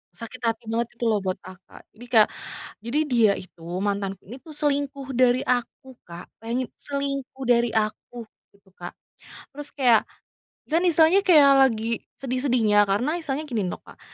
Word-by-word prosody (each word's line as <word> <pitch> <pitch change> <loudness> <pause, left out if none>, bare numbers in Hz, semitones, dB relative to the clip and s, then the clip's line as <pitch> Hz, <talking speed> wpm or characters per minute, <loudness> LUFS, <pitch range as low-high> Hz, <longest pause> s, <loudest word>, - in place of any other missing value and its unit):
sakit 230 +2 -9
hati 225 -1 -2
banget, 230 +1 0
gitu 235 -1 0
lo, 210 - +1
buat 190 -1 -2
akak. 185 0 -14
Jadi 235 +3 -13
kayak, 225 -3 +5 0.5
jadi 235 +6 -1
dia 230 -6 +4
itu, 175 -2 -14 0.2
mantanku 200 -1 -2
ini 230 - -8
tuh 320 - -12
selingkuh 280 -2 -2
dari 250 0 +3
aku, 250 +1 -2
Kak. 170 +1 -11 0.2
Bayangin, 240 +2 -2 0.2
selingkuh 275 -2 -4
dari 240 -1 +3
aku, 220 +2 -3 0.2
gitu, 200 -1 -27
Kak. 175 0 -8 0.6
Terus 290 +1 -9
kayak, 245 -6 +3 0.7
kan 330 - +4
istilahnya 330 +3 +5
kayak 305 -8 +6 0.2
lagi 225 0 -3 0.2
sedih-sedihnya, 245 -6 +2
karena 255 - 0
istilahnya 300 -1 -3
gini 245 -8 -3
loh, - - -4
Kak. - - -16
240 Hz, 155 wpm, -24 LUFS, 215-275 Hz, 0.7 s, kayak